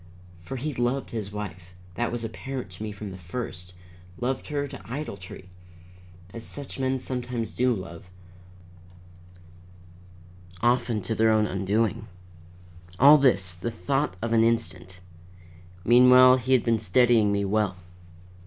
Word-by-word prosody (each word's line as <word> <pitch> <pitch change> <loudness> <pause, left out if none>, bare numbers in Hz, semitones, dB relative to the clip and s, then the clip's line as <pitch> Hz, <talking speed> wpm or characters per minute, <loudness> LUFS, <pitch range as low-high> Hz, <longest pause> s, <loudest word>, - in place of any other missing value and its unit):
For 85 +10 -7
he 145 +4 -3
loved 125 +2 -1
his 105 -3 -5
wife 90 -4 -8 0.2
that 120 +5 -2
was 120 -1 -4
apparent 130 -1 -6
to 90 - -12
me 110 -1 -4
from 100 0 -8
the 95 - -10
first; 90 -1 -7 0.4
loved 130 +2 -2
her 145 -2 -2
to - - -10
idolatry, 100 -9 -7 0.9
as 115 - -8
such 140 +3 -6
men 130 0 0
sometimes 125 -3 -4
do 125 +1 +2
love, 90 -2 -9 2.5
often 120 -2 +1
to 105 - -2
their 110 0 +3
own 110 -1 +3
undoing. 105 +3 -1 0.9
All 145 +6 +8
this, 100 -10 +2
the 90 +7 -4
thought 135 +2 -1
of 115 0 -1
an 115 -1 +4
instant. 95 -6 -1 0.8
Meanwhile 125 +2 +7
he 130 +1 0
had 125 - +4
been 115 -2 +1
studying 110 +1 +3
me 100 0 0
well. 105 -2 0
115 Hz, 135 wpm, -26 LUFS, 100-125 Hz, 2.5 s, All